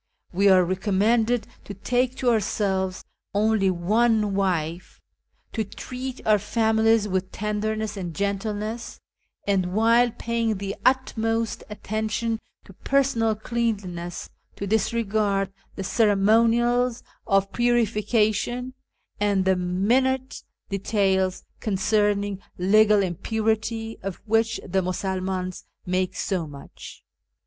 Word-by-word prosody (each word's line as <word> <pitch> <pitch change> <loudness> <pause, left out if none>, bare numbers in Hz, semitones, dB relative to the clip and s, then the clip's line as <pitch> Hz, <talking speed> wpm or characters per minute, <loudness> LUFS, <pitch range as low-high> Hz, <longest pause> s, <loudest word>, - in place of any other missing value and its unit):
We 200 +3 +4
are 185 -2 +6
recommended 215 +5 +1 0.2
to 200 - -7
take 245 +5 0
to 250 -2 +2
ourselves 195 -4 -1 0.3
only 210 -2 +3
one 210 +4 +2
wife, 180 -3 -2 0.5
to 220 - 0
treat 255 +5 -7
our 215 -1 +4
families 220 +1 +2
with 190 -1 -2
tenderness 215 +1 -2
and 175 -5 -5
gentleness, 210 +3 -3 0.5
and, 190 -2 0
while 230 +2 +4
paying 230 -2 -1
the 195 0 -4
utmost 225 -3 0
attention 215 +2 -2 0.3
to 195 - -14
personal 240 -2 +1
cleanliness, 205 -7 -3 0.2
to 200 - -4
disregard 210 -2 0 0.2
the 195 - -4
ceremonials 230 +4 +3 0.2
of 195 -2 +2
purification 240 +1 +1 0.5
and 200 -2 +2
the 190 0 +4
minute 240 +9 0 0.3
details 195 -2 0 0.2
concerning 205 -1 0 0.2
legal 210 +2 +4
impurity, 220 +4 -2
of 195 -1 -4
which 225 +1 +1
the 190 +1 +1
Musulmans 185 0 -3 0.2
make 185 0 -1
so 180 -5 -2
much. 140 -1 -11
210 Hz, 105 wpm, -24 LUFS, 190-225 Hz, 0.5 s, are